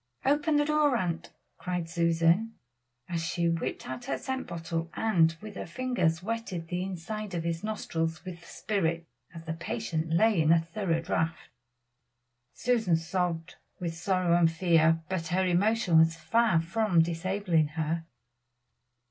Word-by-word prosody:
"Open 295 +2 +2
the 295 0 +3
door, 300 -4 +3
aunt," 170 -4 -2 0.3
cried 180 -2 -3
Susan, 170 +6 +2 0.5
as 170 -2 -2
she 170 0 0
whipped 165 0 -2
out 130 -1 -6
her 135 - -1
scent 260 - -4
bottle 165 0 -4
and 165 -7 +3
with 215 -1 -8
her - - -6
finger 250 -1 +1
wetted 200 -6 -4
the 180 0 -2
inside 195 +2 -5
of 165 - -2
his 165 +1 -2
nostrils 170 -6 -3
with 180 -2 -7
the 170 - -16
spirit 170 -5 -1 0.3
as 165 -1 -10
the 160 - -3
patient 165 -1 -3
lay 200 +2 +4
in 155 - +2
the 165 - +7
thorough 165 0 -1
draught. 165 0 -2 1.1
Susan 225 -8 +2
sobbed 165 -1 -2 0.2
with 170 -2 -3
sorrow 175 0 +1
and 170 -1 +4
fear, 165 -1 +3
but 170 -2 -2
her 185 +3 +1
emotion 185 -1 +3
was 165 +1 +4
far 225 +1 +2
from 175 0 +2
disabling 170 -1 0
her. 160 +2 -2
170 Hz, 150 wpm, -29 LUFS, 165-205 Hz, 1.1 s, the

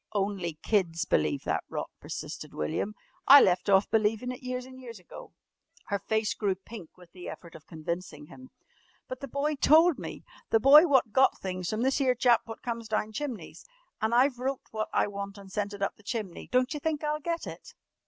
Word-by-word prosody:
"Only 195 -5 -2
kids 175 -6 +1
believe 140 - +1
that - - -1
rot," - - -4
persisted - - -7
William. 80 - -2 0.3
"I 280 +1 +11
left 185 -3 +2
off 195 0 +5
believin' 225 +3 +1
it 250 - -8
years 250 0 -4
and 260 0 -12
years 235 -3 -9
ago!" 180 - -12 0.6
Her 200 -1 0
face 220 0 0
grew 200 -2 -1
pink 190 -2 -12
with 180 -2 -17
the 180 -1 -9
effort 170 -2 -10
of 160 - -14
convincing 160 -1 -6
him. 260 - -14 0.6
"But 255 - -6
the 275 - -6
boy 285 +3 -1
told 315 +3 +5
me, - - -7 0.3
the 225 - +4
boy 295 +8 +8
wot 265 -7 +3
got 260 +4 +3
things 185 -2 -4
from 220 +2 -1
this 265 +2 +1
'ere 255 -2 +3
chap 240 -1 +4
wot 225 - -9
comes 230 -2 -4
down 215 0 -1
chimneys. 270 -3 -6 0.4
An' 220 +1 +1
I've 250 +1 +3
wrote 265 +1 -2
wot 215 0 -3
I - - +2
want 200 0 -6
an' 200 -1 -12
sent 200 +1 -2
it 200 -1 -5
up 195 - -2
the - - -19
chimney. 210 -4 -5
Don't 255 +3 +2
you 300 - -4
think 310 0 -2
I'll 300 0 -1
get 335 +2 -3
it?" - - -10
220 Hz, 205 wpm, -28 LUFS, 195-260 Hz, 0.6 s, I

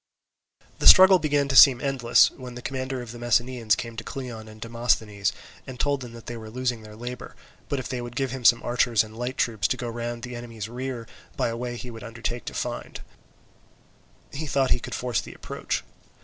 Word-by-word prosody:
The - - +2
struggle 190 -1 +10
began 145 -3 +1
to 135 - 0
seem 130 0 +9
endless, 135 -4 +4
when 125 -2 -10
the 125 - -9
commander 130 -1 -3
of 115 - -9
the 120 - -10
Messenians 120 -1 +2
came 115 -1 -6
to 115 - -5
Cleon 120 -5 -7
and 110 0 -13
Demosthenes, 115 -3 0 0.4
and 130 -2 -8
told 145 -1 +1
them 120 -2 -8
that 115 -1 -11
they 120 - -6
were 110 -1 -9
losing 125 0 -2
their 105 -1 -12
labour: 125 +2 -7 0.3
but 140 - 0
if 130 - -4
they 125 -1 -4
would 120 0 -8
give 135 -1 -1
him 130 -1 -6
some 120 0 +5
archers 120 -2 +2
and 110 0 -12
light 125 +3 -4
troops 110 -4 +1
to - - -1
go 120 - -4
round 120 0 -4
on - - -9
the - - -6
enemy's 115 -3 -6
rear 125 0 -5 0.3
by - - +1
a 115 - -3
way 120 0 -4
he 125 +1 -7
would 115 -1 -10
undertake 115 +1 -5
to - - -6
find, - - -4 1.3
he 155 +2 -4
thought 135 -2 +1
he - - +3
could - - -6
force 120 -5 -1
the - - -11
approach. - - -4
120 Hz, 220 wpm, -25 LUFS, 115-130 Hz, 1.3 s, struggle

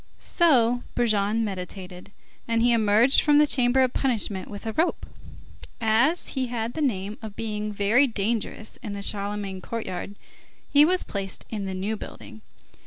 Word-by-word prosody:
So 245 -8 +3
Brujon 215 -1 +1
meditated, 185 -2 -6 0.4
and 230 0 +1
he 240 - +4
emerged 225 +3 +5
from 295 -1 +4
the 300 - +6
chamber 255 -2 +2
of 255 - 0
punishment 215 -7 -1
with 205 +1 -8
a 220 - -3
rope. 330 +7 0 0.7
As 235 +9 +2
he 260 -2 -2
had 235 -1 -3
the 315 - -4
name 210 -6 -2
of 215 -3 -8
being 210 -1 -3
very 210 +7 +3
dangerous 220 0 -3
in 210 -5 -6
the 200 0 -5
Charlemagne 200 -2 -2
courtyard, 205 -2 -5 0.6
he 290 +1 +7
was 365 +2 +2
placed 195 -2 -6
in 210 -3 -3
the 190 -1 -4
New 200 +4 -2
Building. 220 +1 -10
220 Hz, 160 wpm, -25 LUFS, 200-245 Hz, 0.7 s, he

